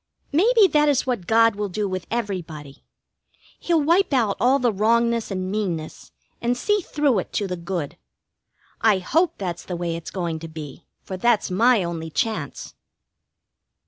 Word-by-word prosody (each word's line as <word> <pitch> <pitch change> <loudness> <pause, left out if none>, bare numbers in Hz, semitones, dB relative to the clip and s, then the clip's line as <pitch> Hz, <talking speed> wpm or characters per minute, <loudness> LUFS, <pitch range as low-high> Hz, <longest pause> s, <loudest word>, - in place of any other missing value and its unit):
Maybe 425 +7 +5
that 300 -1 +3
is 280 -2 +2
what 240 -9 -2
God 225 -1 +4
will 205 0 -3
do 205 +2 -2
with 185 -2 -4
everybody. 175 -11 -5 0.8
He'll 330 -3 +1
wipe 345 +5 +3
out 220 -6 +2
all 255 +4 +4
the 245 -4 +1
wrongness 230 +3 +1
and 185 -1 -3
meanness, 180 -7 -4 0.3
and 240 +1 0
see 415 +8 +1
through 290 - +1
it - - -6
to 205 - 0
the 180 -2 -3
good. 170 -4 -5 0.8
I 215 -3 +4
hope 320 - +1
that's 175 -3 -4
the 180 - -5
way 170 -1 -3
it's 165 -1 -7
going 170 -4 -3
to 165 - -7
be, 155 -1 -10 0.2
for 190 - -6
that's 225 -1 +1
my 225 +2 +4
only 165 -2 -4
chance. 160 - -3
205 Hz, 165 wpm, -23 LUFS, 175-245 Hz, 0.8 s, Maybe